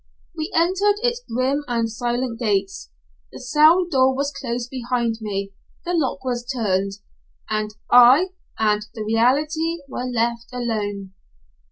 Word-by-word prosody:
We 310 Hz, -, -4 dB
entered 380 Hz, +5 st, +3 dB
its 485 Hz, 0 st, 0 dB
grim 260 Hz, +5 st, 0 dB
and 235 Hz, -2 st, 0 dB
silent 240 Hz, +1 st, -3 dB
gates, 200 Hz, -, -1 dB, 0.4 s
the -, -, -10 dB
cell 310 Hz, +7 st, +4 dB
door 265 Hz, -5 st, +3 dB
was 280 Hz, +1 st, -1 dB
closed 240 Hz, -1 st, -4 dB
behind 240 Hz, -3 st, -1 dB
me, 200 Hz, -2 st, -4 dB, 0.3 s
the 350 Hz, -, -2 dB
lock 275 Hz, -5 st, -1 dB
was 245 Hz, -2 st, -2 dB
turned, 200 Hz, -6 st, -1 dB, 0.6 s
and 215 Hz, 0 st, -1 dB, 0.2 s
I 255 Hz, +9 st, +7 dB, 0.3 s
and 210 Hz, -1 st, +2 dB
the 220 Hz, -, -4 dB
reality 300 Hz, +9 st, +1 dB
were 250 Hz, -, -5 dB
left 235 Hz, -1 st, -1 dB
alone. 205 Hz, -6 st, -3 dB
245 Hz, 135 wpm, -22 LUFS, 225-285 Hz, 0.6 s, I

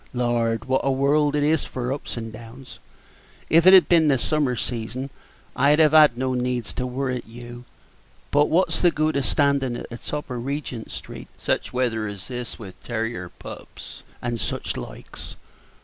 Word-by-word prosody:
Lord, 120 Hz, -2 st, 0 dB
wot 130 Hz, 0 st, +1 dB
a 135 Hz, -, +1 dB
world 145 Hz, +2 st, +2 dB
it 145 Hz, -, +2 dB
is 155 Hz, 0 st, +2 dB
for 125 Hz, 0 st, -3 dB
ups 140 Hz, -, -6 dB
and 115 Hz, -1 st, -5 dB
downs! 115 Hz, +4 st, -11 dB, 0.7 s
If 165 Hz, +2 st, +6 dB
it 190 Hz, -, +10 dB
had 185 Hz, -, +7 dB
been 165 Hz, -3 st, +5 dB
the 140 Hz, -2 st, +4 dB
summer 145 Hz, -1 st, +1 dB
season, 125 Hz, +3 st, -4 dB, 0.4 s
I'd 140 Hz, +3 st, +4 dB
have 155 Hz, -2 st, +5 dB
had 150 Hz, -6 st, +7 dB
no 130 Hz, 0 st, 0 dB
needs 125 Hz, -5 st, -2 dB
to 125 Hz, -, -3 dB
worrit 125 Hz, -1 st, -3 dB
you; 120 Hz, +1 st, -10 dB, 0.7 s
but 145 Hz, +1 st, +4 dB
what's 180 Hz, +4 st, +2 dB
the 175 Hz, -, +6 dB
good 155 Hz, -1 st, 0 dB
of 140 Hz, -2 st, +1 dB
standin' 140 Hz, -4 st, +1 dB
at -, -, -8 dB
the 120 Hz, -, -6 dB
top 150 Hz, -2 st, -5 dB
of 120 Hz, -1 st, -4 dB
Regent 135 Hz, -4 st, -4 dB
street -, -, -8 dB
such -, -, -1 dB
weather 115 Hz, -4 st, 0 dB
as 100 Hz, +1 st, -7 dB
this 125 Hz, -2 st, -5 dB
with 95 Hz, -4 st, -11 dB
tarrier 115 Hz, -6 st, -3 dB
pups -, -, -11 dB, 0.2 s
and 120 Hz, -1 st, -2 dB
such -, -, -3 dB
likes? -, -, -8 dB
125 Hz, 180 wpm, -24 LUFS, 120-145 Hz, 0.7 s, it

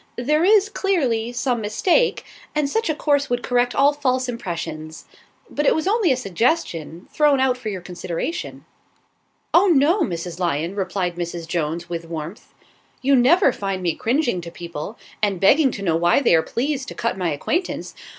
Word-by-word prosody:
There 300 Hz, +6 st, +1 dB
is, 410 Hz, +1 st, +5 dB
clearly, 270 Hz, -, 0 dB
some 245 Hz, -1 st, -1 dB
mistake, 355 Hz, -, +1 dB, 0.3 s
and 300 Hz, -2 st, +1 dB
such 450 Hz, +6 st, -1 dB
a 310 Hz, -, +1 dB
course 285 Hz, -1 st, +1 dB
would 245 Hz, 0 st, -1 dB
correct 245 Hz, 0 st, +1 dB
all 285 Hz, +1 st, +4 dB
false 260 Hz, -3 st, 0 dB
impressions. 165 Hz, -8 st, -6 dB, 0.4 s
But 295 Hz, -1 st, -1 dB
it -, -, +4 dB
was 315 Hz, +3 st, -1 dB
only 410 Hz, -5 st, +3 dB
a 255 Hz, -, +2 dB
suggestion, 195 Hz, -, -1 dB
thrown 295 Hz, -3 st, +3 dB
out 260 Hz, -1 st, +2 dB
for 250 Hz, -3 st, -6 dB
your 190 Hz, -3 st, -5 dB
consideration." 180 Hz, -, -5 dB, 0.9 s
"Oh, 365 Hz, +4 st, +6 dB
no, 335 Hz, +4 st, +4 dB
Mrs. 170 Hz, -, -3 dB
Lyon," 170 Hz, 0 st, -1 dB
replied 185 Hz, -3 st, -2 dB
Mrs. 170 Hz, -1 st, -5 dB
Jones, 165 Hz, 0 st, -2 dB
with 170 Hz, -1 st, -5 dB
warmth. 165 Hz, +4 st, -7 dB, 0.5 s
"You 275 Hz, +1 st, +4 dB
never 270 Hz, +4 st, +4 dB
find 195 Hz, -2 st, -3 dB
me 170 Hz, -2 st, +1 dB
cringing 240 Hz, -, 0 dB
to 170 Hz, -, -8 dB
people, 170 Hz, +4 st, -7 dB, 0.2 s
and 200 Hz, -4 st, 0 dB
begging 270 Hz, -, +5 dB
to 200 Hz, -5 st, -6 dB
know 165 Hz, -4 st, +2 dB
why 175 Hz, +6 st, +3 dB
they 275 Hz, -, +3 dB
are 165 Hz, -, +5 dB
pleased 265 Hz, -, -2 dB
to -, -, -7 dB
cut 230 Hz, -, -1 dB
my 180 Hz, -3 st, -1 dB
acquaintance. 335 Hz, -, -2 dB
235 Hz, 175 wpm, -22 LUFS, 175-290 Hz, 0.9 s, Oh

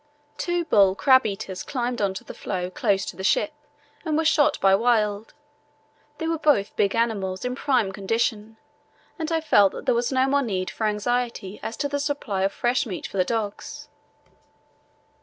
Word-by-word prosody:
Two 350 Hz, -1 st, -1 dB
bull 195 Hz, -9 st, +4 dB
crab 260 Hz, 0 st, +5 dB
eaters 195 Hz, -2 st, -5 dB
climbed 245 Hz, -3 st, -3 dB
on 195 Hz, -2 st, 0 dB
to -, -, -7 dB
the -, -, -9 dB
floe 180 Hz, -2 st, -4 dB
close 195 Hz, 0 st, 0 dB
to -, -, -6 dB
the 190 Hz, -, -7 dB
ship 305 Hz, +9 st, +2 dB, 0.5 s
and 310 Hz, -2 st, 0 dB
were 320 Hz, -, +1 dB
shot 310 Hz, -2 st, +3 dB
by 195 Hz, 0 st, +4 dB
Wild. 215 Hz, -1 st, +1 dB, 0.8 s
They 325 Hz, -, -3 dB
were 330 Hz, -1 st, -1 dB
both 290 Hz, -10 st, +2 dB
big 200 Hz, -1 st, +1 dB
animals 205 Hz, -4 st, -1 dB
in 250 Hz, -, -1 dB
prime 250 Hz, -6 st, +1 dB
condition, 220 Hz, +2 st, -2 dB, 0.6 s
and 320 Hz, 0 st, -3 dB
I 325 Hz, -1 st, +1 dB
felt 205 Hz, -11 st, +4 dB
that -, -, -8 dB
there -, -, +3 dB
was 235 Hz, +2 st, 0 dB
no 260 Hz, 0 st, +3 dB
more 280 Hz, +1 st, +2 dB
need 190 Hz, -7 st, -2 dB
for 220 Hz, -, -1 dB
anxiety 215 Hz, -2 st, -2 dB
as 225 Hz, -, -5 dB
to 285 Hz, -, -1 dB
the 285 Hz, 0 st, -2 dB
supply 280 Hz, -9 st, -2 dB
of 195 Hz, +1 st, +1 dB
fresh 245 Hz, +4 st, 0 dB
meat 185 Hz, -5 st, -5 dB
for -, -, -6 dB
the 185 Hz, -, +4 dB
dogs. 210 Hz, 0 st, -4 dB
225 Hz, 185 wpm, -24 LUFS, 195-270 Hz, 0.8 s, crab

